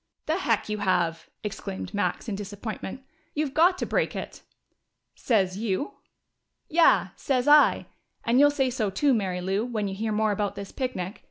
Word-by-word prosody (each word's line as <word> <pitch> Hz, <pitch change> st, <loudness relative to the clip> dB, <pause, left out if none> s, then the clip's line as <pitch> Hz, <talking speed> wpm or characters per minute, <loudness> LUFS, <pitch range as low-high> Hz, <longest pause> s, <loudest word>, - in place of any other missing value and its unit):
"The 315 Hz, +2 st, 0 dB
heck 230 Hz, -, +1 dB
you 210 Hz, 0 st, -3 dB
have!" 175 Hz, -4 st, 0 dB
exclaimed 195 Hz, -1 st, -5 dB
Max, 205 Hz, +4 st, -1 dB
in 215 Hz, -, -2 dB
disappointment. 205 Hz, +4 st, -6 dB, 0.3 s
"You've 295 Hz, -2 st, -1 dB
got 350 Hz, +4 st, +4 dB
to -, -, -2 dB
break -, -, 0 dB
it!" -, -, -6 dB, 0.7 s
"Sez 195 Hz, -5 st, +1 dB
you?" 220 Hz, +5 st, -1 dB, 0.8 s
"Yeah! 335 Hz, +1 st, +4 dB
Sez 255 Hz, -1 st, 0 dB
I. 295 Hz, 0 st, +6 dB, 0.4 s
And 235 Hz, +3 st, +3 dB
you'll 290 Hz, +1 st, +7 dB
say 270 Hz, -3 st, 0 dB
so 220 Hz, -5 st, -1 dB
too, 270 Hz, +9 st, +2 dB
Mary 190 Hz, -5 st, -1 dB
Lou, 195 Hz, +4 st, 0 dB
when 225 Hz, -4 st, -2 dB
you 195 Hz, -, -4 dB
hear 215 Hz, +3 st, -2 dB
more 215 Hz, 0 st, +2 dB
about 205 Hz, 0 st, -1 dB
this 200 Hz, -1 st, -7 dB
picnic. 210 Hz, -8 st, -4 dB
215 Hz, 170 wpm, -26 LUFS, 195-265 Hz, 0.8 s, you'll